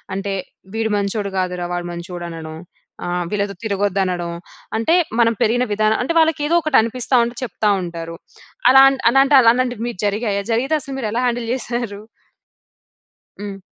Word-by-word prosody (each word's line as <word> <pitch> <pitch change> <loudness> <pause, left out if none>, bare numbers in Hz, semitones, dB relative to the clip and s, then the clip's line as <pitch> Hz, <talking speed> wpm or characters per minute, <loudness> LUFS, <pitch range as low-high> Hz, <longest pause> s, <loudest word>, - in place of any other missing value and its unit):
అంటే, 195 0 -3 0.4
వీడు 225 0 0
మంచోడు 200 0 -2
కాదురా! 180 -1 -2
వాడు 175 0 -3
మంచోడనడం. 170 -2 -7 0.5
ఆహ్, 175 0 -1
వీళ్ళతో 200 0 -2
తిరగొద్దనడం, 190 -4 -1 0.5
అంటే, 230 +10 +2 0.2
మనం 230 -1 +4
పెరిగిన 245 +3 +2
విధానం 215 +1 +2
అంటే 300 - -1
వాళ్ళకి 320 -1 +2
ఏదోకటి 310 -3 +3
అనిపిస్తా 250 +3 0
ఉంటది, 235 0 -6
చెప్తా 210 -1 -1
ఉంటారు. 165 -1 -6 0.6
అలాంట్ 270 0 +6
అలాంటి 270 +2 +4
అలాంటివి 245 0 +2
మీకు 230 -7 -6
జరిగాయా? 205 -1 -1
జరిగితే 260 +7 +1
అసలు 275 -3 -7
మీరెలా 225 +1 -1
హ్యాండిల్ 240 -1 -1
జేసేరు? 235 -5 -4 1.4
హ్మ్. 200 -1 -6
215 Hz, 135 wpm, -19 LUFS, 190-245 Hz, 1.4 s, అలాంట్